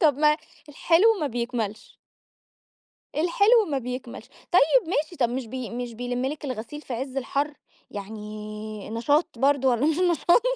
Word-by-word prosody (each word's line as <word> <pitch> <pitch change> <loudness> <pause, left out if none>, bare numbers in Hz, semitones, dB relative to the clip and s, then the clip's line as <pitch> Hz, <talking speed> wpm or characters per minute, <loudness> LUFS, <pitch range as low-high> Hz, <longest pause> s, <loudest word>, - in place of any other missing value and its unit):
طب 305 -6 +5
ما 300 0 +5 0.3
الحلو 350 +9 +4
ما 300 - +1
بيكملش. 235 -4 -4 1.2
الحلو 405 +8 +4
ما 275 - +1
بيكملش، 250 -1 -6
طيّب 350 - +2
ماشي 310 0 -1
طب 240 -7 +1
مش 250 -1 -3
بي 255 0 -5
مش 240 0 -5
بيلِم 245 +2 -2
لِك 295 +1 -4
الغسيل 255 +3 -5
في 260 - -6
عز 260 +2 -4
الحر، 280 +3 -1 0.4
يعني 210 0 -7
نشاط 285 +9 +2
برضو 275 0 +3
والّا 240 +3 +1
مش 315 0 +2
نشاط؟ 350 +3 +4
265 Hz, 150 wpm, -25 LUFS, 235-305 Hz, 1.2 s, طب